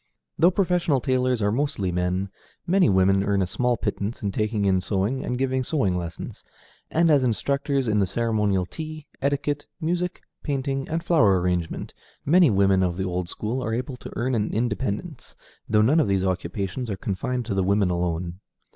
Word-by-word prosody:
Though 170 +3 +7
professional 180 -6 +1
tailors 125 -2 +1
are 105 - +2
mostly 120 -7 -1
men, 90 +2 -1 0.4
many 185 - +4
women 95 0 +4
earn 100 -1 +1
a - - +1
small 125 +6 0
pittance 105 +1 -3
in 100 - 0
taking 105 0 0
in 95 -1 +3
sewing 100 +7 0
and 130 - -3
in - - -1
giving 130 0 0
sewing 115 - 0
lessons; 85 -2 -6 0.5
and 165 0 +3
as 140 -3 +4
instructors 140 +3 0
in 105 -1 +2
the 100 - +2
ceremonial 105 -3 +1
tea, 155 - -7 0.2
etiquette, 145 +1 -1
music, 175 +2 -2 0.2
painting, 135 -1 -2
and 165 +1 -2
flower 110 - +4
arrangement, 90 -2 -2 0.3
many 170 +1 +6
women 100 -2 +3
of 90 -2 0
the 95 - -1
old 90 -1 -2
school 120 +7 -3
are 110 - -1
able 125 +2 -4
to - - -9
earn 130 +2 -1
an 110 -3 0
independence, 120 - -3 0.3
though 105 0 +4
none 145 +9 +4
of 155 - +3
these 95 -1 +1
occupations 95 +5 -2
are 100 - -3
confined 125 +6 -2
to 105 - -2
the 95 -1 +1
women 100 -1 +2
alone. 85 0 -2
110 Hz, 180 wpm, -24 LUFS, 95-140 Hz, 0.5 s, Though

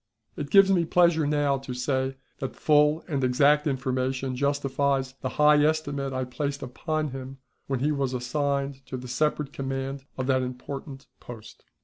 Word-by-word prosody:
It 145 -1 -5
gives 195 +1 +6
me 180 -3 +3
pleasure 170 -2 +3
now 145 -2 +1
to 130 -2 -7
say 130 +1 -1 0.2
that 135 - -4
full 150 +1 +3
and 140 -6 -1
exact 145 +4 +4
information 130 -1 -1
justifies 140 -1 0
the 130 - -2
high 150 0 +6
estimate 145 -3 0
I 130 0 -2
placed 140 +2 -4
upon 155 +4 -2
him 135 0 -7 0.3
when 135 -2 -1
he 150 +2 +2
was 135 -3 -1
assigned 140 +2 -2
to 130 - -5
the 125 0 -8
separate 150 +2 -1
command 135 0 -4
of 130 - -2
that 130 -1 +2
important 135 +2 -6
post. 115 -3 -11
135 Hz, 160 wpm, -26 LUFS, 130-150 Hz, 0.3 s, gives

